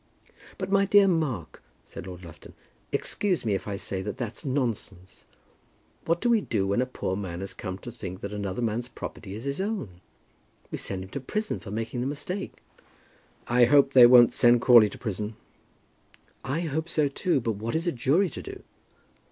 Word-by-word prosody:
"But, 190 Hz, 0 st, -4 dB
my 200 Hz, 0 st, +4 dB
dear 200 Hz, 0 st, +6 dB
Mark," 150 Hz, -, -1 dB, 0.2 s
said -, -, -9 dB
Lord 90 Hz, -1 st, -9 dB
Lufton, 85 Hz, -, -13 dB, 0.4 s
"excuse 190 Hz, -10 st, -1 dB
me 105 Hz, -, +1 dB
if 95 Hz, -, -3 dB
I 100 Hz, -, -3 dB
say 95 Hz, -1 st, -4 dB
that 95 Hz, -, -5 dB
that's 120 Hz, -4 st, -5 dB
nonsense. 120 Hz, -9 st, -3 dB, 0.8 s
What 170 Hz, +1 st, +1 dB
do 245 Hz, -, +1 dB
we 230 Hz, -3 st, +4 dB
do 100 Hz, -, -1 dB
when 100 Hz, +5 st, +1 dB
a 130 Hz, -, -1 dB
poor 95 Hz, -6 st, -3 dB
man 95 Hz, -3 st, -5 dB
has 95 Hz, 0 st, -5 dB
come 95 Hz, -1 st, -6 dB
to 120 Hz, -, -9 dB
think 95 Hz, -6 st, -8 dB
that 100 Hz, +1 st, -5 dB
another 100 Hz, +2 st, -3 dB
man's 115 Hz, +2 st, -1 dB
property 105 Hz, -4 st, -8 dB
is 110 Hz, -, -7 dB
his 140 Hz, +5 st, -2 dB
own? 190 Hz, -, -4 dB, 0.7 s
We -, -, -4 dB
send 95 Hz, -1 st, -4 dB
him 95 Hz, -, -11 dB
to -, -, -4 dB
prison 210 Hz, +11 st, -3 dB
for 110 Hz, -, -10 dB
making 115 Hz, +4 st, -3 dB
the 125 Hz, -, -1 dB
mistake." 150 Hz, +7 st, -5 dB, 0.8 s
"I 120 Hz, 0 st, +5 dB
hope 140 Hz, +1 st, +4 dB
they 125 Hz, -2 st, +9 dB
won't 120 Hz, -1 st, +7 dB
send 120 Hz, 0 st, +5 dB
Crawley 120 Hz, -4 st, +7 dB
to -, -, -10 dB
prison." 105 Hz, -1 st, -4 dB, 1.1 s
"I 140 Hz, +6 st, -2 dB
hope 160 Hz, 0 st, -3 dB
so 155 Hz, -3 st, +2 dB
too; 155 Hz, +2 st, 0 dB
but 115 Hz, -4 st, -2 dB
what 115 Hz, +7 st, -3 dB
is 165 Hz, +2 st, -1 dB
a 175 Hz, -, +1 dB
jury 150 Hz, +8 st, +1 dB
to -, -, -7 dB
do?" -, -, -9 dB
120 Hz, 195 wpm, -27 LUFS, 100-155 Hz, 1.1 s, they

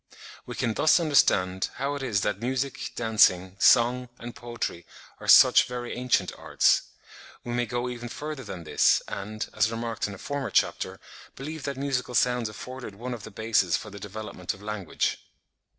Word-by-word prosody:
We 125 Hz, -, -6 dB
can 120 Hz, -3 st, 0 dB
thus 155 Hz, +9 st, +4 dB
understand 95 Hz, -, +2 dB
how 140 Hz, +2 st, -2 dB
it 145 Hz, -, -5 dB
is 110 Hz, -7 st, 0 dB
that 105 Hz, 0 st, -1 dB
music, 130 Hz, 0 st, -2 dB
dancing, 95 Hz, -5 st, +3 dB
song, 125 Hz, +1 st, +4 dB
and 120 Hz, +1 st, -8 dB
poetry 120 Hz, -8 st, -5 dB, 0.3 s
are -, -, -9 dB
such -, -, +8 dB
very 125 Hz, -1 st, -5 dB
ancient 125 Hz, -7 st, +1 dB
arts. -, -, +3 dB, 0.6 s
We 120 Hz, -, -5 dB
may 120 Hz, 0 st, 0 dB
go 120 Hz, +1 st, -2 dB
even 120 Hz, -1 st, -6 dB
further 150 Hz, +1 st, -6 dB
than 95 Hz, -6 st, -7 dB
this, -, -, +3 dB
and, 105 Hz, +2 st, -5 dB
as 110 Hz, 0 st, +2 dB
remarked 115 Hz, -1 st, -3 dB
in 100 Hz, -, -7 dB
a -, -, -12 dB
former 140 Hz, +5 st, -4 dB
chapter, -, -, 0 dB, 0.4 s
believe 155 Hz, +3 st, -6 dB
that 140 Hz, -2 st, -3 dB
musical 135 Hz, -3 st, -2 dB
sounds 125 Hz, -2 st, +2 dB
afforded 125 Hz, -1 st, -8 dB
one 125 Hz, +4 st, -5 dB
of 120 Hz, -, -7 dB
the -, -, -8 dB
bases 110 Hz, -4 st, +1 dB
for 105 Hz, -, -9 dB
the 100 Hz, -, -9 dB
development 105 Hz, -2 st, -6 dB
of 95 Hz, -, -16 dB
language. 105 Hz, -5 st, -2 dB
120 Hz, 175 wpm, -27 LUFS, 105-125 Hz, 0.6 s, such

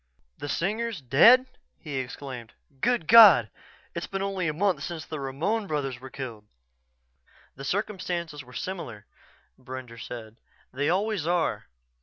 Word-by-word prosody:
"The 145 Hz, -, -5 dB
Singers 215 Hz, +4 st, -1 dB
dead?" 160 Hz, -, +6 dB, 0.3 s
he 145 Hz, -4 st, -6 dB
exclaimed. 125 Hz, -2 st, -6 dB, 0.3 s
"Good 240 Hz, -, +1 dB
God 195 Hz, -, +9 dB, 0.4 s
it's 170 Hz, -, -4 dB
been 195 Hz, 0 st, -3 dB
only 195 Hz, -3 st, -1 dB
a -, -, +1 dB
month 190 Hz, +3 st, +1 dB
since 165 Hz, -4 st, -5 dB
the 155 Hz, -, -6 dB
Ramon 165 Hz, +11 st, -2 dB
brothers 135 Hz, -6 st, -2 dB
were 130 Hz, +1 st, -10 dB
killed." 115 Hz, -6 st, -8 dB, 1.1 s
"The 135 Hz, -, -9 dB
circumstances 175 Hz, -4 st, -3 dB
were 125 Hz, -, -16 dB
similar," 125 Hz, -, -6 dB, 0.5 s
Brender 130 Hz, -2 st, -9 dB
said. 115 Hz, -2 st, -8 dB, 0.4 s
"They 145 Hz, +3 st, 0 dB
always 195 Hz, -2 st, 0 dB
are. 175 Hz, -1 st, 0 dB
155 Hz, 135 wpm, -27 LUFS, 130-195 Hz, 1.1 s, God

